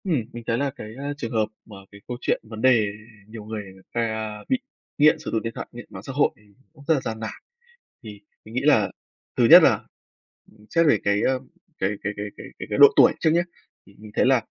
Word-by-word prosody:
Ừm, 165 Hz, -10 st, 0 dB
mình 120 Hz, 0 st, -8 dB
thấy 115 Hz, -, +1 dB
là 140 Hz, +2 st, 0 dB
cái, 115 Hz, -, -8 dB
a, 145 Hz, +1 st, -3 dB
trường 115 Hz, -6 st, -5 dB
hợp 110 Hz, -2 st, +1 dB, 0.2 s
mà 105 Hz, -, -13 dB, 0.2 s
cái 100 Hz, 0 st, -14 dB
câu 125 Hz, -, -5 dB
chuyện -, -, 0 dB
vấn 110 Hz, 0 st, -9 dB
đề 115 Hz, -5 st, +4 dB, 0.4 s
nhiều 110 Hz, -1 st, -9 dB
người 110 Hz, -1 st, -5 dB
người 95 Hz, 0 st, -19 dB
ta 110 Hz, -2 st, -3 dB
bị 260 Hz, -, +2 dB, 0.4 s
nghiện 150 Hz, +1 st, +5 dB
sử 155 Hz, -, -6 dB
dụng 110 Hz, -, 0 dB
điện 115 Hz, 0 st, -4 dB
thoại, -, -, -6 dB
nghiện 120 Hz, 0 st, -10 dB
mạng 95 Hz, 0 st, -10 dB
xã 135 Hz, -, -7 dB
hội 145 Hz, -, +3 dB
thì -, -, -24 dB, 0.3 s
cũng 145 Hz, -3 st, -16 dB
rất 165 Hz, -, +5 dB
là 140 Hz, -, 0 dB
gian 110 Hz, -2 st, -5 dB
nản. 110 Hz, -, -4 dB, 0.7 s
Thì 105 Hz, -2 st, -10 dB, 0.2 s
mình 110 Hz, -, -12 dB
nghĩ 130 Hz, -, +1 dB
là 115 Hz, -10 st, +4 dB, 0.5 s
thứ -, -, +4 dB
nhất -, -, +11 dB
là, -, -, +6 dB, 0.8 s
ừm, 105 Hz, 0 st, -21 dB
xét 165 Hz, -1 st, +3 dB
về 145 Hz, -, +4 dB
cái, 100 Hz, 0 st, +2 dB
a, -, -, +3 dB, 0.5 s
cái 95 Hz, -, 0 dB
cái 100 Hz, -, -2 dB
cái 105 Hz, -, -4 dB
cái -, -, -10 dB
cái -, -, -6 dB
cái -, -, -1 dB
độ -, -, +11 dB
tuổi -, -, +7 dB
trước 160 Hz, -, +3 dB
nhá, 170 Hz, +2 st, +3 dB, 0.4 s
thì 100 Hz, -, -19 dB
mình 105 Hz, +1 st, -12 dB
thấy -, -, +3 dB
là 130 Hz, -3 st, +4 dB
115 Hz, 245 wpm, -24 LUFS, 105-140 Hz, 0.8 s, nhất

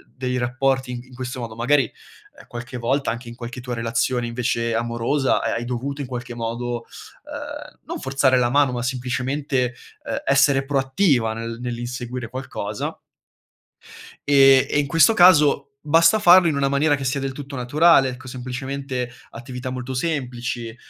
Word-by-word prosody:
dei 125 Hz, -1 st, -2 dB
rapporti 130 Hz, +1 st, 0 dB
in 125 Hz, +1 st, -8 dB
questo 130 Hz, 0 st, -6 dB
modo. 115 Hz, -2 st, -6 dB
Magari, 130 Hz, +5 st, +2 dB
ehm, -, -, -15 dB
qualche 120 Hz, +1 st, -7 dB
volta 130 Hz, +3 st, 0 dB
anche 120 Hz, +1 st, -7 dB
in 115 Hz, -, -8 dB
qualche 125 Hz, +1 st, -7 dB
tua 125 Hz, 0 st, -5 dB
relazione 115 Hz, +1 st, -1 dB
invece 115 Hz, -1 st, -1 dB
amorosa, 120 Hz, +4 st, 0 dB
hai -, -, -1 dB
hai 120 Hz, +1 st, -2 dB
dovuto 130 Hz, +4 st, -4 dB
in 135 Hz, -, -4 dB
qualche 120 Hz, -1 st, -6 dB
modo, 120 Hz, +1 st, -4 dB, 0.4 s
uhm, -, -, -8 dB
non -, -, -5 dB
forzare 135 Hz, -1 st, +2 dB
la 120 Hz, -1 st, +2 dB
mano, 140 Hz, -1 st, +3 dB
ma 120 Hz, -1 st, -3 dB
semplicemente, 130 Hz, +1 st, -1 dB, 0.3 s
ehm, -, -, -3 dB
essere 140 Hz, 0 st, +4 dB
proattiva 135 Hz, -, +1 dB
nel 115 Hz, +1 st, -6 dB
nell'inseguire 120 Hz, 0 st, -5 dB
qualcosa 110 Hz, -5 st, -5 dB, 1.3 s
ehm, 135 Hz, -1 st, +7 dB
e -, -, 0 dB
in 145 Hz, -, 0 dB
questo 165 Hz, +9 st, +5 dB
caso 165 Hz, -8 st, +6 dB, 0.2 s
basta 165 Hz, +7 st, +4 dB
farlo 175 Hz, -3 st, +7 dB
in 145 Hz, -, -1 dB
una 140 Hz, -, +2 dB
maniera 145 Hz, +2 st, +2 dB
che 135 Hz, -, -5 dB
sia 135 Hz, +1 st, -1 dB
del 135 Hz, -1 st, -2 dB
tutto 140 Hz, +1 st, -8 dB
naturale, 135 Hz, +2 st, +4 dB
ecco 130 Hz, +1 st, -9 dB
semplicemente 130 Hz, 0 st, -4 dB, 0.2 s
attività 125 Hz, +1 st, -7 dB
molto 130 Hz, 0 st, -5 dB
semplici, 125 Hz, -5 st, -3 dB
130 Hz, 160 wpm, -22 LUFS, 120-140 Hz, 1.3 s, ehm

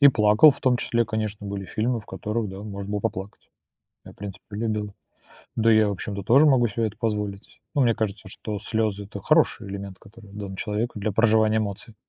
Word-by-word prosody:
И 140 Hz, -, +9 dB
плакал 105 Hz, +4 st, +6 dB
в 140 Hz, -, -5 dB
том 125 Hz, -1 st, +3 dB
числе, 120 Hz, -1 st, +1 dB
конечно, 110 Hz, -1 st, -3 dB
были 100 Hz, -1 st, -4 dB
фильмы, 115 Hz, +4 st, -1 dB
в 105 Hz, -, -15 dB
которых, 105 Hz, 0 st, -3 dB
да, 95 Hz, +1 st, -8 dB
можно 100 Hz, -1 st, -6 dB
было 105 Hz, 0 st, -1 dB
поплакать. 95 Hz, +1 st, -5 dB, 0.5 s
Я, -, -, -11 dB
в -, -, -24 dB
принципе, 100 Hz, 0 st, -8 dB
любил. 105 Hz, -1 st, -2 dB, 0.6 s
Да, 115 Hz, 0 st, +4 dB
я, 110 Hz, -1 st, +5 dB
в -, -, -1 dB
общем-то, 100 Hz, 0 st, -4 dB
тоже 135 Hz, +9 st, +6 dB
могу 125 Hz, -4 st, +4 dB
себе 110 Hz, +2 st, -1 dB
это 105 Hz, 0 st, -9 dB
позволить. 105 Hz, -3 st, -3 dB
Ну 145 Hz, -, +3 dB
мне 120 Hz, -2 st, +4 dB
кажется, 105 Hz, -2 st, -3 dB
что 105 Hz, +2 st, -5 dB
слёзы 110 Hz, -2 st, -1 dB
это 100 Hz, 0 st, -8 dB
хороший 155 Hz, -, +2 dB
элемент, 100 Hz, -1 st, -7 dB
который 105 Hz, -1 st, -16 dB
дан 100 Hz, -2 st, -6 dB
человеку 105 Hz, +4 st, -2 dB
для 105 Hz, +1 st, -1 dB
проживания 110 Hz, +1 st, +3 dB
эмоций. 105 Hz, +2 st, -4 dB
105 Hz, 205 wpm, -25 LUFS, 100-115 Hz, 0.6 s, И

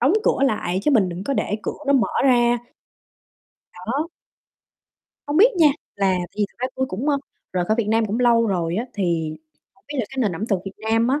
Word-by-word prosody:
đóng 270 Hz, +8 st, +4 dB
cửa -, -, +2 dB
lại 190 Hz, -6 st, -1 dB
chứ 300 Hz, -, +2 dB
mình 210 Hz, -9 st, +4 dB
đừng 175 Hz, +3 st, -6 dB
có 280 Hz, -, -1 dB
để 210 Hz, -, -1 dB
cửa -, -, -4 dB
nó 280 Hz, -, +4 dB
mở 265 Hz, -4 st, +3 dB, 0.2 s
ra. 240 Hz, -2 st, +4 dB, 1.1 s
Đó. 255 Hz, -, -3 dB, 1.2 s
Hông 290 Hz, +1 st, -1 dB
biết 455 Hz, +8 st, +6 dB
nha, 325 Hz, -, +6 dB, 0.3 s
là 195 Hz, -1 st, +2 dB
tại 175 Hz, -, -3 dB
vì 210 Hz, -, +2 dB
thật -, -, -30 dB
ra 255 Hz, +1 st, -1 dB
tui 260 Hz, -, 0 dB
cũng, 250 Hz, +8 st, -3 dB
ơ, 285 Hz, -, +3 dB, 0.4 s
rời 180 Hz, -1 st, 0 dB
khỏi 215 Hz, +4 st, +1 dB
Việt 210 Hz, -, 0 dB
Nam 225 Hz, 0 st, +2 dB
cũng 220 Hz, +4 st, -2 dB
lâu 235 Hz, -2 st, +4 dB
rồi 175 Hz, -3 st, -1 dB
á. 230 Hz, -, -1 dB
Thì 170 Hz, -5 st, 0 dB, 0.4 s
hông -, -, -31 dB
biết 295 Hz, -, -6 dB
là 245 Hz, -, +1 dB
cái 270 Hz, -, -8 dB
nền 215 Hz, -7 st, +1 dB
ẩm 215 Hz, +6 st, -3 dB
thực 195 Hz, -5 st, +1 dB
Việt 195 Hz, -, -6 dB, 0.2 s
Nam 225 Hz, +2 st, +3 dB
á 280 Hz, +3 st, +1 dB
225 Hz, 230 wpm, -22 LUFS, 190-260 Hz, 1.2 s, biết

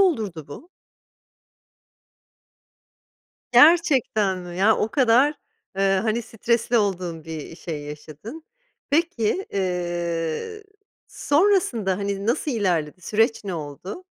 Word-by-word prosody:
olurdu 215 Hz, -, 0 dB
bu? 310 Hz, -, -11 dB, 2.8 s
Gerçekten 255 Hz, -, +4 dB
mi? 175 Hz, -1 st, -8 dB
Yani, 205 Hz, +4 st, +4 dB
o 215 Hz, -, 0 dB
kadar, 265 Hz, +2 st, +4 dB, 0.4 s
eee, 195 Hz, 0 st, +2 dB
hani, 225 Hz, +1 st, 0 dB
stresli 235 Hz, +1 st, 0 dB
olduğun 180 Hz, -6 st, -2 dB
bir 160 Hz, 0 st, -7 dB
şey 155 Hz, -5 st, -6 dB
yaşadın. 155 Hz, -, -9 dB, 0.5 s
Peki, 330 Hz, -, 0 dB
eee, 175 Hz, -, -2 dB, 0.4 s
sonrasında, 285 Hz, -, +1 dB
hani, 200 Hz, 0 st, -3 dB
nasıl 270 Hz, +6 st, 0 dB
ilerledi, 180 Hz, -, -1 dB
süreç 225 Hz, +5 st, +1 dB
ne 190 Hz, -3 st, -3 dB
oldu? 165 Hz, -, -7 dB
200 Hz, 95 wpm, -23 LUFS, 175-250 Hz, 2.8 s, Gerçekten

